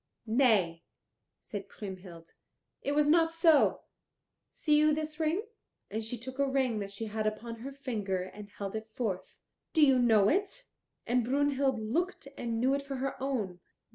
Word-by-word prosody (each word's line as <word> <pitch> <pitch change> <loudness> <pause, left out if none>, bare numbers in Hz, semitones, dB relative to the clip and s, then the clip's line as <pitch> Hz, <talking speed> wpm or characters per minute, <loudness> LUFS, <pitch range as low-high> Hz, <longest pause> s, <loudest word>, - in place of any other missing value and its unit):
"Nay," 215 -9 +3 0.6
said 200 -1 -7
Kriemhild, 185 -4 -9 0.5
"it 285 - -1
was 295 0 +4
not 325 +2 +4
so. 330 -2 +4 0.7
See 300 -2 +1
you 305 0 +4
this 310 0 -4
ring?" 325 +6 +1 0.5
And 220 +2 -2
she 225 +3 -4
took 260 +3 -7
a 280 - +3
ring 260 -5 +1
that 200 -1 -5
she 200 +3 -5
had 215 0 -2
upon 230 +2 -4
her 260 +5 -7
finger 210 -9 -2
and 205 +2 -10
held 200 0 -6
it 220 0 -5
forth. 195 -7 -3 0.3
"Do 315 -3 +6
you 265 -2 +5
know 220 -5 +5
it?" 400 - 0 0.4
And 245 +1 +2
Brunhild 275 0 +1
looked 290 - -2
and 230 -2 -2
knew 260 +3 +3
it 280 - 0
for 280 -1 -6
her 265 +1 -2
own. 220 -10 -2
245 Hz, 170 wpm, -31 LUFS, 210-285 Hz, 0.7 s, Do